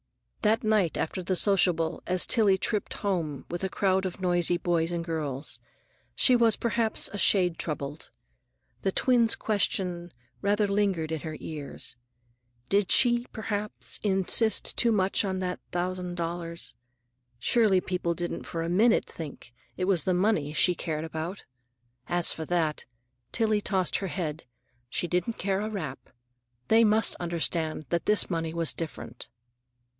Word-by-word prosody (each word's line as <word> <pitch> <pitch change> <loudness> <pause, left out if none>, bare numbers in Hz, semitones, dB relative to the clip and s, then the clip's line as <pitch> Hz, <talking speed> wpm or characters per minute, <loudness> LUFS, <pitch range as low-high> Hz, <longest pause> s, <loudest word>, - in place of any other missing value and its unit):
That 220 +2 +2
night 215 -6 +2
after 185 +4 -2
the 185 +1 -1
sociable, 175 -4 +2
as 180 0 +3
Tillie 210 -5 +4
tripped 210 +2 -2
home 170 -9 -2
with 175 +2 -4
a 190 - 0
crowd 190 0 +1
of 185 - -8
noisy 175 -1 +2
boys 170 -1 0
and 170 -1 -3
girls, 150 -4 -3 0.6
she 255 - +4
was 230 -3 +4
perhaps 230 -1 +1
a 205 - -3
shade 180 -5 +3
troubled. 150 -1 -4 0.7
The 195 - 0
twin's 235 +1 +3
question 180 -4 -1 0.3
rather 205 +1 +2
lingered 195 -6 0
in 160 - -2
her 155 +1 -6
ears. 145 -4 -6 0.7
Did 200 -1 +2
she, 240 -1 +4
perhaps, 210 -2 -4
insist 205 +2 +3
too 235 - +3
much 195 -1 +2
on 190 -2 -2
that 180 -1 -3
thousand 180 0 -3
dollars? 170 0 -4 0.6
Surely, 205 - +3
people 180 -2 -2
didn't 175 0 -4
for 165 -1 -3
a 165 - -3
minute 220 +6 +3
think 145 -6 -9 0.2
it 185 - -1
was 185 -4 +2
the 185 - +2
money 180 -6 +1
she 180 +4 +4
cared 160 -2 -3
about? 160 +4 -5 0.6
As 175 -1 +3
for 160 - -5
that, 160 -2 -1 0.5
Tillie 215 -2 +1
tossed 190 -3 0
her 195 - -3
head, 165 -4 -4 0.4
she 175 - -2
didn't 180 +6 -1
care 195 0 -1
a 215 - -3
rap. 155 -11 -6 0.6
They 225 +1 +6
must 215 -1 +4
understand 165 -2 -1
that 170 - -1
this 210 -2 +3
money 165 -1 -2
was 165 -2 +1
different. 150 -7 -6
180 Hz, 150 wpm, -27 LUFS, 165-205 Hz, 0.7 s, They